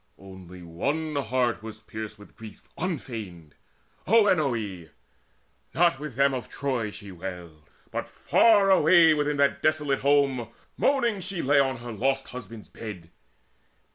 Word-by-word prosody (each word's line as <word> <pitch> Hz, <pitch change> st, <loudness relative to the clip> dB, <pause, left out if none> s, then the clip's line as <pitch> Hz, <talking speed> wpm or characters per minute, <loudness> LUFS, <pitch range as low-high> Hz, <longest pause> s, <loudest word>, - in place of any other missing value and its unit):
One 95 Hz, -2 st, -13 dB
only 140 Hz, -, -3 dB
heart 125 Hz, -1 st, 0 dB
was 110 Hz, 0 st, -9 dB
pierced 110 Hz, -1 st, -7 dB
with 105 Hz, -, -16 dB
grief 110 Hz, -2 st, -12 dB
unfeigned, 110 Hz, -, -6 dB, 0.5 s
Oenone. 130 Hz, -, +2 dB, 0.9 s
Not 170 Hz, -5 st, +3 dB
with 150 Hz, -5 st, -7 dB
them 140 Hz, +1 st, +3 dB
of 125 Hz, -2 st, -5 dB
Troy 130 Hz, -6 st, -2 dB
she 105 Hz, -1 st, -10 dB
wailed, 85 Hz, -4 st, -9 dB, 0.2 s
But -, -, -4 dB
far 205 Hz, -4 st, +4 dB
away 165 Hz, -2 st, +6 dB
within 150 Hz, -1 st, 0 dB
that 140 Hz, 0 st, +2 dB
desolate 150 Hz, -3 st, +1 dB
home 140 Hz, -4 st, +2 dB, 0.3 s
Moaning 240 Hz, -7 st, +1 dB
she 185 Hz, -1 st, -3 dB
lay 140 Hz, +1 st, +4 dB
on 135 Hz, -2 st, +1 dB
her 120 Hz, 0 st, -8 dB
lost 135 Hz, +5 st, -1 dB
husband's 115 Hz, -3 st, -9 dB
bed. 90 Hz, -7 st, -9 dB
130 Hz, 135 wpm, -26 LUFS, 105-150 Hz, 0.9 s, away